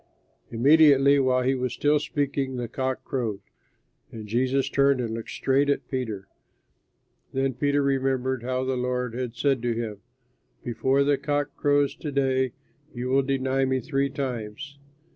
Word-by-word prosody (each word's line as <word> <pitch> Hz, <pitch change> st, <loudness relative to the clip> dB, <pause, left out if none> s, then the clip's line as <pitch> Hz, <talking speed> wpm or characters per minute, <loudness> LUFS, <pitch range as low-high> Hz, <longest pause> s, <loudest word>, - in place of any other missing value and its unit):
Immediately 140 Hz, +2 st, +5 dB
while 130 Hz, -1 st, +2 dB
he 130 Hz, +2 st, +2 dB
was 125 Hz, -2 st, -2 dB
still 145 Hz, +3 st, +2 dB
speaking, 140 Hz, -2 st, -2 dB
the 120 Hz, -1 st, -3 dB
cock 130 Hz, +2 st, -3 dB
crowed. 115 Hz, -7 st, -3 dB, 0.7 s
And 110 Hz, -2 st, -8 dB
Jesus 130 Hz, +5 st, 0 dB
turned 140 Hz, -1 st, +3 dB
and 115 Hz, -2 st, -2 dB
looked 115 Hz, 0 st, -6 dB
straight 140 Hz, +2 st, +1 dB
at 140 Hz, -, 0 dB
Peter. 110 Hz, -7 st, -4 dB, 1.1 s
Then 135 Hz, 0 st, 0 dB
Peter 145 Hz, +2 st, +1 dB
remembered 130 Hz, -2 st, 0 dB
how 130 Hz, +1 st, -2 dB
the 130 Hz, 0 st, -1 dB
Lord 125 Hz, -1 st, -2 dB
had 120 Hz, -1 st, -4 dB
said 135 Hz, 0 st, +1 dB
to 120 Hz, -1 st, 0 dB
him, 110 Hz, -3 st, -4 dB, 0.6 s
"Before 130 Hz, +3 st, +1 dB
the 140 Hz, -1 st, +2 dB
cock 145 Hz, 0 st, -2 dB
crows 145 Hz, -1 st, +2 dB
to 150 Hz, -, -5 dB
day 130 Hz, -2 st, +1 dB, 0.4 s
you 125 Hz, +1 st, -3 dB
will 135 Hz, +1 st, +4 dB
deny 135 Hz, 0 st, 0 dB
me 130 Hz, 0 st, +1 dB
three 140 Hz, 0 st, -1 dB
times." 130 Hz, 0 st, -5 dB
130 Hz, 155 wpm, -25 LUFS, 125-140 Hz, 1.1 s, Immediately